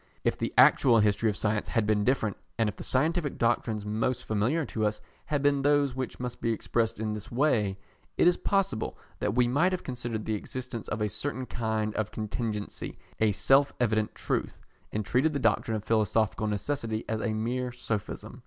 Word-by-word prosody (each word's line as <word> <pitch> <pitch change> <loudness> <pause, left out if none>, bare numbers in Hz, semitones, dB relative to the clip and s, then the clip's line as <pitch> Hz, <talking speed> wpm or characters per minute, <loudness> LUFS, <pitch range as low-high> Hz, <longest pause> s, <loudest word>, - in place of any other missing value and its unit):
If - - +2
the - - -2
actual 120 -4 +7
history 105 +1 +3
of 105 - -2
Science 105 0 0
had 115 -2 +1
been 105 -1 +2
different, 110 -4 +1 0.2
and 115 -1 +2
if 105 - -3
the - - -8
scientific 155 +3 0
doctrines 115 -2 0
most 110 +4 -1
familiar 120 +10 +1
to 110 - -3
us 105 0 -3 0.3
had 145 -2 -1
been 140 -1 +3
those 145 -1 +3
which 130 0 -4
must 125 -1 -5
be 115 - +1
expressed 115 0 -1
in 110 -1 -1
this 105 -1 -6
way, 115 -7 +2 0.4
it - - +5
is 175 - +5
possible 195 - 0 0.2
that 105 - -1
we 125 -1 +4
might 150 +9 +3
have 180 - -3
considered 120 -4 -4
the 110 - -1
existence 120 +2 -5
of 110 - -3
a 105 - +2
certain 130 +5 -3
kind 110 -3 -1
of 110 -1 -1
contingency 110 -1 -4 0.2
a 110 -1 +4
self 135 +7 +4
evident 110 -3 +1
truth, - - -2 0.3
and 105 -1 -2
treated 130 +8 +2
the 140 - -1
doctrine 115 -3 +1
of 105 - -7
philosophical 110 -1 +1
necessity 110 +1 -2
as 110 0 -2
a 110 -1 -1
mere 125 +3 -1
sophism. 110 -1 -4
115 Hz, 190 wpm, -28 LUFS, 110-130 Hz, 0.4 s, actual